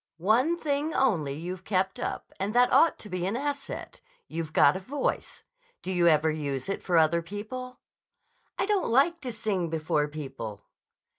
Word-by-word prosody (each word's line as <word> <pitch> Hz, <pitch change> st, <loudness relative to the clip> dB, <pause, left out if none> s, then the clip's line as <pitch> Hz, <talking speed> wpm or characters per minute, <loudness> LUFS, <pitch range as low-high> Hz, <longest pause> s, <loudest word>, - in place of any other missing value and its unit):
One 235 Hz, -, +2 dB
thing 300 Hz, 0 st, -1 dB
only 165 Hz, -, +2 dB
you've 180 Hz, +4 st, -6 dB
kept 190 Hz, -1 st, 0 dB
up, -, -, -4 dB
and 200 Hz, +4 st, -2 dB
that 245 Hz, +1 st, +5 dB
ought 330 Hz, -, +5 dB
to -, -, -10 dB
be 185 Hz, -2 st, -2 dB
an 200 Hz, -, -1 dB
asset. 280 Hz, +1 st, -4 dB, 0.3 s
You've 160 Hz, -1 st, -4 dB
got 145 Hz, -2 st, +5 dB
a -, -, -2 dB
voice. 275 Hz, +9 st, -3 dB, 0.4 s
Do 190 Hz, -, -3 dB
you 175 Hz, -2 st, +3 dB
ever 155 Hz, -1 st, +4 dB
use 140 Hz, -1 st, -3 dB
it 195 Hz, -, -2 dB
for 175 Hz, -2 st, +1 dB
other 165 Hz, +1 st, +4 dB
people?" 220 Hz, +8 st, -7 dB, 0.8 s
"I -, -, +1 dB
don't 410 Hz, -2 st, +1 dB
like 285 Hz, +8 st, +3 dB
to 255 Hz, -3 st, -4 dB
sing 210 Hz, -6 st, -2 dB
before 155 Hz, -2 st, 0 dB
people." 135 Hz, -9 st, -7 dB
190 Hz, 170 wpm, -28 LUFS, 160-255 Hz, 0.8 s, that